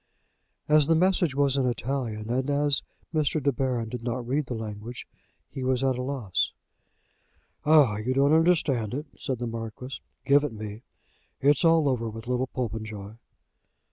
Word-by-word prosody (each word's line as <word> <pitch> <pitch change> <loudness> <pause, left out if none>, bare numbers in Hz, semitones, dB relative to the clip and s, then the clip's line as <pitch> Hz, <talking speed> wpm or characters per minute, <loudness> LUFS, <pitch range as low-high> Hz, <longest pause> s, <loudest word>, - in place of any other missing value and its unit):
As 150 -1 +5
the 165 - +4
message 175 -3 +2
was 140 -1 +2
in 130 -2 +2
Italian, 120 -3 -2
and 130 +3 0
as 145 -1 +2 0.3
Mr. 155 0 +1
De 140 0 +2
Baron 125 -3 -1
did 120 +1 -6
not 120 0 -3
read 140 +2 0
the 125 - -3
language, 110 +2 -7 0.4
he 130 - -6
was 130 0 +1
at 130 -1 +2
a 125 - -3
loss. 125 -9 -1 1.1
"Ah! 145 -9 +6
you 125 +5 -1
don't 140 +2 +4
understand 155 - +2
it," 150 +2 -4
said 135 -4 -3
the 120 - -3
Marquis. 115 +3 -6 0.2
"Give 140 +1 +5
it 145 - -2
me. 105 0 -7 0.6
It's 145 0 +3
all 165 -2 +5
over 120 -4 0
with 110 +1 -8
little 125 +1 0
Popenjoy." 110 -4 -5
130 Hz, 165 wpm, -27 LUFS, 115-145 Hz, 1.1 s, Ah